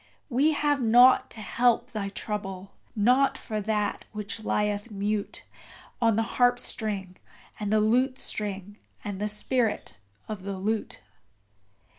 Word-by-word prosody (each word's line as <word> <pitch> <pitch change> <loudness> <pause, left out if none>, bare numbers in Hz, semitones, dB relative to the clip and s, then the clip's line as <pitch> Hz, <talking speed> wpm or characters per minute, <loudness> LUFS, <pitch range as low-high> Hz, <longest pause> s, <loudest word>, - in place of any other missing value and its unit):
We 285 +5 +3
have 290 -2 +1
nought 245 +3 +6
to 220 - -8
help 240 +3 +1
thy 205 -3 -3
trouble 195 -2 -5 0.2
nought 250 +6 +3
for 215 -2 -4
that 210 0 -1
which 215 +1 -5
lieth 210 0 -1
mute 205 0 -3 0.6
On 230 -2 +4
the 225 +3 -2
harpstring 215 -6 0 0.4
and 210 -1 -2
the 215 - +4
lutestring 215 -4 0 0.3
and 200 -1 -5
the 210 - 0
spirit 220 - -1 0.3
of 210 -3 -5
the 195 0 -5
lute. 215 +3 -2
215 Hz, 125 wpm, -27 LUFS, 205-245 Hz, 0.6 s, nought